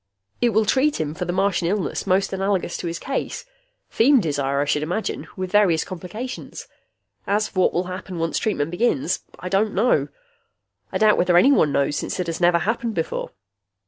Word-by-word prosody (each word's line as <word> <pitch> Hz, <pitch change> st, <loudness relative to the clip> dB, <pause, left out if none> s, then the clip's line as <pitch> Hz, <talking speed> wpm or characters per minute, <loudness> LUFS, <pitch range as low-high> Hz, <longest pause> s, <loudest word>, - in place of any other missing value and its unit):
"It 240 Hz, -, +4 dB
will 220 Hz, 0 st, +2 dB
treat 275 Hz, +7 st, +2 dB
him 150 Hz, -1 st, -2 dB
for 180 Hz, +2 st, -4 dB
the 175 Hz, -, -2 dB
Martian 190 Hz, -2 st, +1 dB
illness 200 Hz, +1 st, -2 dB
most 195 Hz, +1 st, +1 dB
analogous 190 Hz, -2 st, -1 dB
to -, -, -5 dB
his 170 Hz, 0 st, -3 dB
case. 275 Hz, -, -4 dB, 0.5 s
Feem 265 Hz, +4 st, +5 dB
desire, 140 Hz, -6 st, -1 dB
I 145 Hz, -, +1 dB
should 145 Hz, +1 st, 0 dB
imagine, 175 Hz, +8 st, -3 dB
with 185 Hz, -1 st, -4 dB
various 195 Hz, -6 st, +4 dB
complications. 200 Hz, +8 st, -7 dB, 0.6 s
As 210 Hz, +2 st, +1 dB
for 185 Hz, -, -4 dB
what 185 Hz, -, +3 dB
will 175 Hz, -, +1 dB
happen 185 Hz, 0 st, -7 dB
once 165 Hz, 0 st, -1 dB
treatment 165 Hz, -8 st, -1 dB
begins, 175 Hz, -, 0 dB, 0.2 s
I 180 Hz, -, -7 dB
don't 200 Hz, +3 st, +1 dB
know. 225 Hz, +6 st, +2 dB, 0.8 s
I -, -, -1 dB
doubt 215 Hz, -1 st, +4 dB
whether 175 Hz, -1 st, +4 dB
anyone 215 Hz, -, +5 dB
knows, 140 Hz, +1 st, +1 dB
since -, -, -4 dB
it 180 Hz, -, 0 dB
has 165 Hz, +1 st, -4 dB
never 175 Hz, 0 st, +5 dB
happened 225 Hz, +4 st, -2 dB
before. 165 Hz, -1 st, -3 dB
185 Hz, 185 wpm, -22 LUFS, 170-215 Hz, 0.8 s, Feem